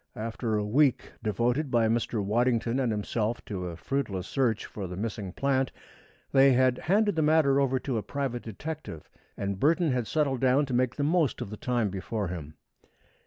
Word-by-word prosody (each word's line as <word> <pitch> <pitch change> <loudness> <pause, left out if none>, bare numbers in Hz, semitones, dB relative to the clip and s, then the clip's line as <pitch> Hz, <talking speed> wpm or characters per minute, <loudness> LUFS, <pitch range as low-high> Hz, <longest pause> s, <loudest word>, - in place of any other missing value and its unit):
After 115 0 -2
a 105 -1 0
week 135 +5 +2
devoted 120 +7 0
by 120 -3 +3
Mr. 115 -2 0
Waddington 120 +3 +1
and 125 -4 +1
himself 110 +2 -2
to 90 -3 -4
a 85 -2 -6
fruitless 105 -7 -2
search 120 -4 0
for 100 -3 -6
the 90 0 -7
missing 105 -2 -4
plant, 135 +4 0 0.6
they 135 0 +6
had 130 0 +3
handed 205 +2 +2
the 160 - +1
matter 150 -3 +4
over 135 -1 +2
to 125 -3 -2
a - - -3
private 135 -1 -3
detective 115 - -7 0.3
and 100 -1 -3
Burton 165 - +3
had 125 -3 -1
settled 140 -3 0
down 135 +2 +4
to 130 - -5
make 125 0 +1
the 145 - -1
most 155 -2 +2
of 100 - -5
the - - -4
time 120 -1 0
before 100 +1 -3
him. 80 -3 -7
120 Hz, 185 wpm, -28 LUFS, 105-140 Hz, 0.6 s, they